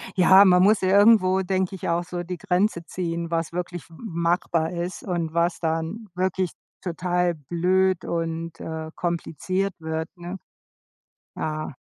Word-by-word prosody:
Ja, 190 +2 +7
man 180 0 +6
muss 210 +2 +4
irgendwo, 190 -1 +5
denke 190 0 -1
ich, 185 - -5
auch 170 +1 +1
so 175 0 -5
die 180 0 -5
Grenze 190 -1 0
ziehen, 170 -2 -3
was 165 0 -2
wirklich 175 -1 -5
m 165 - -15
machbar 170 -2 0
ist 175 +1 -4
und 170 -4 -2
was 170 +1 +1
dann 165 +7 -2
wirklich 185 0 0 0.3
total 175 0 0
blöd 180 +5 +1
und, 165 0 -3
äh, 160 0 -5
kompliziert 185 +3 -2
wird, 160 0 -3
ne? 175 +2 -7 1.0
Ja. 155 -2 -3
175 Hz, 140 wpm, -24 LUFS, 165-185 Hz, 1.0 s, Ja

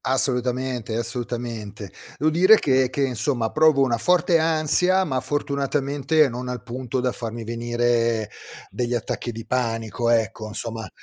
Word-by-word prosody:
Assolutamente, 125 -3 +1
assolutamente. 115 -2 -4 0.3
Devo 155 +2 +2
dire 185 +7 +6
che 130 -5 +2
che 140 +2 -1
insomma 125 -2 -1
provo 155 -3 +4
una 120 -3 0
forte 175 +2 +3
ansia, 165 +4 +2
ma 135 -8 -1
fortunatamente 140 +2 0
non 125 0 -6
al 125 -4 -5
punto 130 +1 -4
da 125 0 0
farmi 115 -1 -6
venire 115 -1 0 0.4
degli 120 0 -2
attacchi 120 +1 -3
di 115 0 -8
panico 115 -1 -1
ecco, 110 -2 0
insomma. 110 +1 -5
125 Hz, 135 wpm, -23 LUFS, 115-140 Hz, 0.4 s, dire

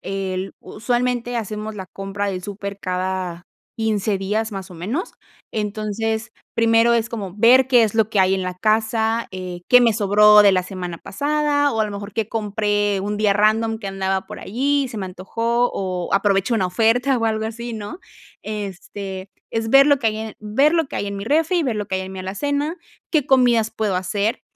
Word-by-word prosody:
el 190 -1 -4
usualmente 245 +1 -2
hacemos 215 0 -4
la 190 -2 -7
compra 195 +2 -4
del 185 -1 -4
súper 200 0 -6
cada 185 -1 -3 0.3
15 215 -3 0
días, 215 +3 -2
más 190 -1 -7
o 180 - -10
menos. 215 - -4 0.4
Entonces, 215 +1 -3 0.2
primero 230 +1 +4
es 230 0 +1
como 200 -5 -6
ver 240 +4 +6
qué 245 -3 +6
es 215 - -2
lo 220 -1 +2
que 205 - +2
hay 190 0 +4
en 190 - -2
la 180 0 -3
casa, 220 +3 +1
eh, 180 -1 -6
qué 250 0 +8
me 230 -2 +4
sobró 210 0 +6
de 200 -1 +6
la 185 -1 +2
semana 180 -2 -6
pasada. 290 +4 0
O 220 - -1
a - - +3
lo 210 - -5
mejor 200 0 -7
qué 220 -1 -2
compré 205 -2 0
un 205 +2 -3
día 210 -1 +3
random 220 +2 +2
que 205 - -7
andaba 195 0 -2
por - - -9
allí 280 +6 0
y - - -5
se 225 - -6
me 190 - -3
antojó, 230 +7 -1
o 185 -2 -3
aprovechó 195 +2 +2
una 195 -5 +1
oferta 230 +8 +2
o 230 - -1
algo 220 0 0
así, 235 +2 -6
¿no? 215 - -6 0.4
Este, 195 -2 -6 0.2
es 225 0 -2
ver 275 +2 +7
lo 285 -1 +4
que 230 -4 +1
hay 215 - -3
en 220 -1 -6
ver 270 +10 +2
lo 325 -3 +2
que - - -7
hay 205 - -2
en 200 - -4
mi 200 - -5
refri 325 +6 +2
y - - 0
ver 245 -6 -1
lo 210 -1 -3
que - - -3
hay 190 - -1
en 190 0 -8
mi 190 - -7
alacena. 285 - -2 0.3
¿Qué 300 -5 +2
comidas 240 -5 +3
puedo 215 -3 -1
hacer? 200 +4 -1
215 Hz, 210 wpm, -21 LUFS, 195-230 Hz, 0.4 s, qué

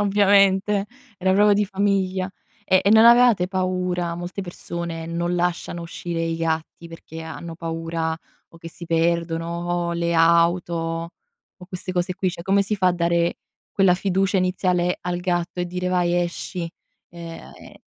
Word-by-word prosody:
Ovviamente, 200 0 +3 0.3
era 185 +1 +2
proprio 205 +2 +5
di 205 +1 +3
famiglia. 195 -1 0 0.3
E 185 -2 +4
e 200 - +4
non 220 +1 +7
avevate 235 -6 +6
paura? 180 -2 -1
Molte 175 +3 -6
persone 170 -2 -6
non 170 +1 -2
lasciano 175 -1 -2
uscire 170 0 -5
i 165 0 -1
gatti, 165 0 -3
perché 165 -1 -10
hanno 165 +1 -7
paura, 165 -1 -3 0.3
o - - -18
che 165 - -9
si 170 - -10
perdono, 165 0 0 0.4
o - - -1
le 170 0 -1
auto, 170 +1 +3 0.8
o 180 - -13
queste 180 0 -6
cose 180 0 -1
qui, 185 0 -1
cioè, 170 - -8
come 195 +2 +3
si 210 +2 -2
fa 185 -2 +3
a - - +2
dare, 170 0 0 0.3
quella 195 -2 +4
fiducia 195 +1 0
iniziale 180 -1 +1
al 175 0 -3
gatto, 175 -1 -2
e 175 - -1
dire: 180 +1 -3
"Vai, 175 -1 +1
esci"? 175 0 -4 0.4
Eh 170 -1 -9
ah, - - -13
ehm - - -14
175 Hz, 165 wpm, -23 LUFS, 170-190 Hz, 0.8 s, non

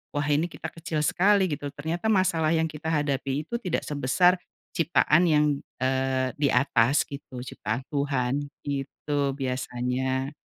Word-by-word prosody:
"Wah, 145 0 0
ini 150 +3 +2
kita 160 - -7
kecil 160 -2 -3
sekali," 195 +3 +4
gitu. 145 0 -3
Ternyata 160 +7 -4
masalah 175 -6 +2
yang 160 0 +2
kita 155 0 -11
hadapi 145 -1 -1
itu 235 - -2
tidak 180 -6 -1
sebesar 150 +6 +3 0.4
ciptaan 165 0 +4
yang, 150 -1 +4 0.4
eee, 130 0 +1
di 145 -1 +2
atas 125 0 +3
gitu 140 -3 -8
ciptaan 115 -1 -4
Tuhan, 140 -1 0 0.2
gitu 140 0 -2
biasanya. 130 +1 -2
145 Hz, 135 wpm, -26 LUFS, 130-160 Hz, 0.4 s, sekali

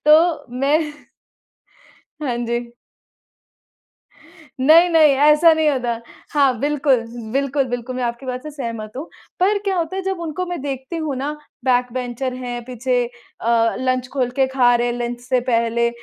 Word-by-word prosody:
तो 310 0 +5
मैं 280 +4 +3 1.4
हाँ 255 -5 -1
जी। 235 0 -2 1.9
नहीं, 320 +6 +7
नहीं, 315 -3 +6 0.2
ऐसा 320 +2 +6
नहीं 315 -1 +2
होता। 240 -4 -1 0.3
हाँ, 275 -5 +3
बिल्कुल, 280 -4 +2 0.3
बिल्कुल, 275 +1 +1
बिल्कुल, 245 +1 -4
मैं 255 - -2
आपकी 235 +2 -4
बात 250 0 -4
से 305 - -7
सहमत 230 -7 -6
हूँ। 290 +5 -6 0.3
पर 405 +3 +3
क्या 390 -2 0
होता 340 +2 -2
है, 385 - -2
जब 380 -2 -2
उनको 335 +2 -3
मैं 355 -2 -4
देखती 270 +3 -4
हूँ 310 -4 -2
ना, 280 +3 -2 0.3
बैकबेंचर 250 0 0
हैं, 245 -1 -5
पीछे 250 0 0 0.4
अ, 230 0 +2
लंच 255 -1 0
खोल 255 -3 0
के 265 -1 +4
खा 255 -2 +3
रहे 240 0 +1
हैं, 240 - -1
लंच 240 0 -3
से 250 0 0
पहले 235 0 +2
260 Hz, 155 wpm, -20 LUFS, 245-300 Hz, 1.9 s, नहीं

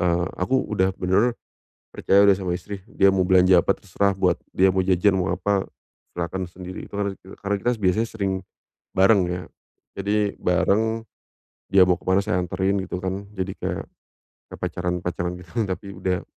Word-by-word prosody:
eee, 85 -1 +1
aku 130 +8 +1
udah 95 -2 +1
bener 100 +7 +2 0.6
percaya 100 +1 +4
udah 100 - +6
sama 90 -2 -3
istri. 95 +1 -8
Dia 100 - +4
mau 95 -1 +3
belanja 90 0 +5
apa - - +2
terserah, 100 +1 0
buat 95 -2 +2 0.2
dia 95 - +4
mau 95 0 +2
jajan 95 +1 +3
mau 95 -1 0
apa 95 +2 0 0.5
silahkan 90 +2 -3
sendiri 90 +1 -9
itu - - -30
kan 100 0 0
re - - -10 0.2
karena 100 0 -1
kita 120 - +1
biasanya 100 +4 +2
sering 100 -4 -2 0.6
bareng 95 +1 +5
ya. 90 +1 -3 0.6
Jadi 105 +1 0
bareng, 110 +5 +1 0.7
dia 95 -1 +6
mau 90 0 +2
kemana 95 +2 +2
saya 105 -3 0
anterin 95 +3 0
gitu 95 -1 -4
kan, 95 +2 -3
jadi 95 0 -2
kayak - - -3 0.7
pacaran-pacaran 90 0 -3
gitu, 85 - -19 0.2
tapi 95 +1 -4
udah 90 -2 -2
95 Hz, 165 wpm, -23 LUFS, 90-100 Hz, 0.7 s, udah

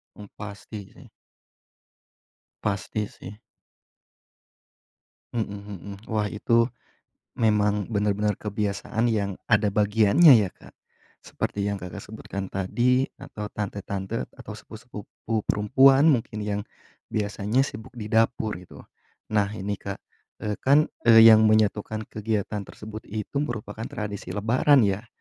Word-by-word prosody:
Mmm, 105 - -11
pasti 105 0 -9
sih. - - -15 1.6
Pasti 105 +1 -2
sih. 105 +2 -11 2.0
Mhm 105 -4 -3
mhm. 100 0 -8
Wah, 105 -2 0
itu 115 +2 +2 0.7
memang 105 -2 +2
benar-benar 105 -1 0
kebiasaan 105 +2 -2
yang 100 -3 -1
ada 105 -2 +3
bagiannya 105 - +6
ya, - - -7
Kak. - - -18 0.5
Seperti 100 - -3
yang 100 0 -1
Kakak 95 +2 -8
sebutkan 100 -3 -7
tadi, 125 +7 +1
atau 105 -1 -7
tante-tante, 100 +1 -4
atau 125 -5 -9
sepupu-sepupu 110 -1 -6
perempuan 135 +8 +5
mungkin 110 -5 -1
yang 105 0 -2 0.5
biasanya 105 +4 0
sibuk 110 -2 -7
di 110 -3 -7
dapur, 110 -2 +1
gitu. 90 - -13 0.5
Nah, 105 -2 +2
ini, 100 0 -3
Kak, 100 0 -6 0.4
eee, 105 -1 -2
kan, 145 +3 +5 0.2
eee, 115 -1 +9
yang 110 0 +7
menyatukan 110 0 +1
kegiatan 105 -1 -2
tersebut 110 0 -10
itu 110 +6 -5
merupakan 115 -5 -4
tradisi 105 -2 -5
lebaran, 125 +6 +4
ya. 100 +3 -1
105 Hz, 115 wpm, -25 LUFS, 100-115 Hz, 2.0 s, eee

